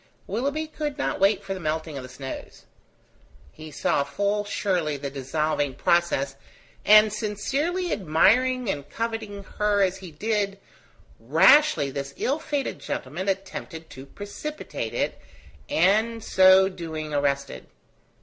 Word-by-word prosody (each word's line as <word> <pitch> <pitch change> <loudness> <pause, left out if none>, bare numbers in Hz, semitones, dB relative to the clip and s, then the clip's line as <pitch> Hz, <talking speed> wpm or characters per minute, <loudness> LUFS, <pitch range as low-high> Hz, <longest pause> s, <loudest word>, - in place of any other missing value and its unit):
Willoughby 280 +9 -2
could 300 -2 -5
not 285 - -2
wait 200 +1 +3
for 195 0 -4
the 190 - -6
melting 155 -1 -3
of 135 - -5
the 130 - -10
snows. 130 +1 -8 0.9
He 155 0 -11
saw 145 -1 0
full 200 +8 -1
surely 180 -7 -1
the 140 0 -5
dissolving 145 +1 -1
process; 140 -6 +1 0.5
and 215 0 +7
sincerely 275 - -2
admiring 230 +9 +3
and 145 -6 -3
coveting 225 -2 -4 0.2
her 205 -1 +3
as 190 0 0
he 190 -2 -10
did, 200 +4 -1 0.6
rashly 160 - +5
this 140 0 -5
ill 280 +4 0
fated 290 -4 -3
gentleman 175 +9 -4
attempted 185 -4 -5
to 135 +1 -10
precipitate 205 - -6
it, - - -1 0.5
and 225 -3 +2
so 190 0 +6
doing 160 -5 -6
arrested. 140 - -1
190 Hz, 130 wpm, -25 LUFS, 150-220 Hz, 0.9 s, and